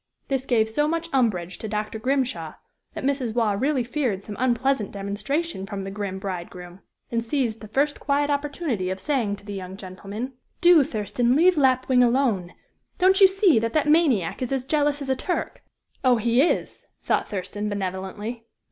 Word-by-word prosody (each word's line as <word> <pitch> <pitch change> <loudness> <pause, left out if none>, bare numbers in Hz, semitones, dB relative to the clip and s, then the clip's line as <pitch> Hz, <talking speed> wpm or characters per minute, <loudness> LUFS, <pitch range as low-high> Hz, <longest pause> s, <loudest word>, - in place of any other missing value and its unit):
This 270 -1 -1
gave 225 -3 +3
so 295 +7 0
much 335 +1 -2
umbrage 190 -9 0
to 220 - -5
Dr. 215 +1 -3
Grimshaw 250 - -1 0.4
that - - -5
Mrs. 265 -4 -1
Waugh 225 -4 +2
really 260 +5 +1
feared 235 -6 -2
some 205 - -7
unpleasant 255 -3 +1
demonstration 205 - -3
from 195 -1 -5
the 195 - -5
grim 200 -1 -4
bridegroom, 180 -1 -7 0.3
and 230 -1 0
seized 230 -3 -1
the 215 - -8
first 285 +7 0
quiet 290 0 +1
opportunity 285 - -2
of 190 0 -3
saying 235 -4 0
to 200 - -17
the 205 - -6
young 190 -1 -7
gentleman: 200 +6 -7 0.3
"Do, 345 -4 +7
Thurston, 225 +2 0
leave 355 +4 +5
Lapwing 260 -2 +3
alone! 235 -8 +2 0.4
Don't 380 +2 +4
you 385 - +10
see 380 - +4
that 230 +1 -2
that 310 -1 +2
maniac 265 - +2
is 255 - -2
as 265 -2 -1
jealous 290 0 +1
as 270 - -6
a 265 - +2
Turk?" 355 +7 -3 0.4
"Oh! 255 -2 +5
he 235 +3 +3
is!" 330 - 0 0.2
thought - - 0
Thurston, 205 +2 -3
benevolently. 205 +4 -4
235 Hz, 175 wpm, -24 LUFS, 200-280 Hz, 0.4 s, you